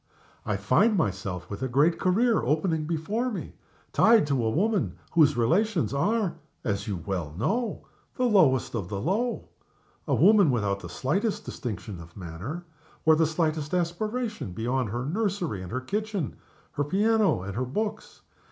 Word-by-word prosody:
I 105 -3 0
find 185 - +3
myself, 95 - -2
with 100 +4 -7
a 130 - 0
great 145 +7 +3
career 220 +5 +3
opening 155 +3 0
before 185 +10 -1
me, 210 - -6 0.4
tied 225 -6 +5
to 140 -4 0
a 110 - +2
woman 205 - 0
whose 150 -5 +4
relations 170 - +2
are 200 +6 0 0.3
(as 105 -1 -2
you 95 -6 -3
well 85 -6 -3
know) 225 - -1 0.3
the 255 - -1
lowest 160 - +4
of 100 -7 -3
the 100 - -3
low. 205 - -1 0.6
A - - +2
woman 205 -6 +6
without 105 -6 0
the 90 - -9
slightest 190 - -1
distinction 105 -5 -6
of 85 +2 -14
manner, 100 - -6 0.4
or 160 0 +7
the 160 0 +3
slightest 155 0 -1
aspiration 210 - -2
beyond 120 +3 -1
her 120 +4 -3
nursery 180 - -1
and 90 - -8
her 130 - -2
kitchen, 205 - -3 0.4
her 145 - -1
piano 205 - +2
and 95 0 -6
her 125 - 0
books. 210 - -4
155 Hz, 160 wpm, -27 LUFS, -, 0.6 s, or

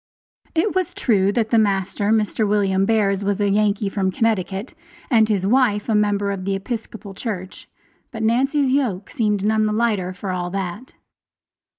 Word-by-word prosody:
It 365 +6 +1
was 370 -3 -1
true 200 -5 +2
that 220 -1 0
the 230 - +5
master, 200 -1 0
Mr. 215 0 +1
William 195 -2 +2
Bears, 205 -3 +1
was 200 0 -1
a 205 - +2
Yankee 205 0 +1
from 195 -1 -1
Connecticut, 200 +1 -1 0.4
and 220 -3 +4
his 195 -3 0
wife 215 -2 +2
a - - +2
member 205 -1 +1
of 195 -2 -4
the 195 +1 -1
Episcopal 215 -1 -6
Church, 190 -3 -6 0.4
but 225 -3 -5
Nancy's 265 +4 +2
yoke 225 -9 -1
seemed 210 -3 0
none 215 0 +2
the 210 - -1
lighter 210 -5 0
for 185 +1 -5
all 180 -1 -3
that. 195 +5 -5
210 Hz, 170 wpm, -21 LUFS, 195-225 Hz, 0.4 s, the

